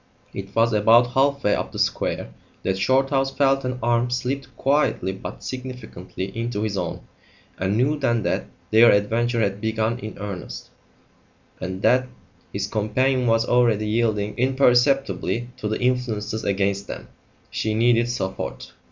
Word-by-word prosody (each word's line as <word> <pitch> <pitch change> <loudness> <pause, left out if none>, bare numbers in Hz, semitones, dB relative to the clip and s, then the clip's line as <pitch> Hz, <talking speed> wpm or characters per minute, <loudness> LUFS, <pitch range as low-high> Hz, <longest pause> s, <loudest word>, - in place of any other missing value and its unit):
It 100 0 -7
was 115 +1 +3
about 115 +3 +5
half 140 +1 +2
way 105 - +3
up - - -2
the - - -8
square - - -1 0.3
that 95 0 -1
Shorthouse 135 +4 +2
felt 135 -1 +3
an 125 0 -2
arm 120 +1 +2
slipped 125 +2 -2
quietly 135 -9 +1
but 95 - -8
significantly 110 -8 -7
into 115 -2 -2
his 105 -2 -2
own, 90 -3 -3 0.6
and 95 +3 0
knew 145 +5 +1
then 120 -5 +1
that - - -1 0.3
their 115 +2 +7
adventure 115 +3 +1
had 100 -1 -1
begun 110 +2 -1
in 110 -3 -7
earnest, 100 -3 -7 0.9
and 95 +1 -5
that 130 0 +4 0.4
his 100 0 -2
companion 125 +5 0
was 115 0 +3
already 115 -4 +3
yielding 105 -2 0
imperceptibly 130 -1 +2
to 110 - -4
the 110 - -2
influences 115 -4 -1
against 100 0 0
them. - - -7 0.4
She 110 0 -1
needed 120 +1 +3
support. 95 -6 -4
115 Hz, 145 wpm, -23 LUFS, 105-125 Hz, 0.9 s, their